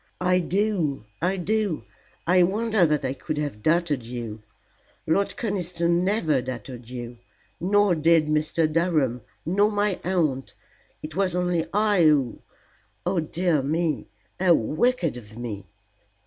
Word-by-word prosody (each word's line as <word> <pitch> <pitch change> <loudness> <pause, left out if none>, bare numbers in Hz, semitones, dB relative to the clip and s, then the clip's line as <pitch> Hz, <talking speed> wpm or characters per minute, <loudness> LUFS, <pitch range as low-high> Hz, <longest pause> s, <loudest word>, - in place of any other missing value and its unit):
"I 180 0 +3
do 180 - 0 0.2
I 185 +3 +1
do. 205 -2 -1 0.4
I 180 +2 +5
wonder 210 0 +2
that 150 -2 0
I 130 - -1
could 155 +2 -5
have 145 -8 -3
doubted 155 0 +1
you. 115 -2 -6 0.6
Lord 195 +5 0
Conniston 175 -5 0
never 175 - +1
doubted 125 -1 -7
you, 120 -1 -7 0.4
nor 200 +2 +3
did 165 0 +4
Mr. 155 +2 +1
Durham, 155 -8 +1 0.2
nor 200 +6 +2
my 205 -2 0
aunt. 155 -8 -1 0.5
It 155 0 -7
was 185 -2 +1
only 180 -2 0
I 210 -2 +3
who 140 -6 +2 0.6
oh 185 - +1
dear 165 -1 +1
me! 155 +2 -1 0.3
How 180 -2 +5
wicked 165 - 0
of 110 -2 -12
me." 105 -5 -6
165 Hz, 135 wpm, -25 LUFS, 135-185 Hz, 0.6 s, I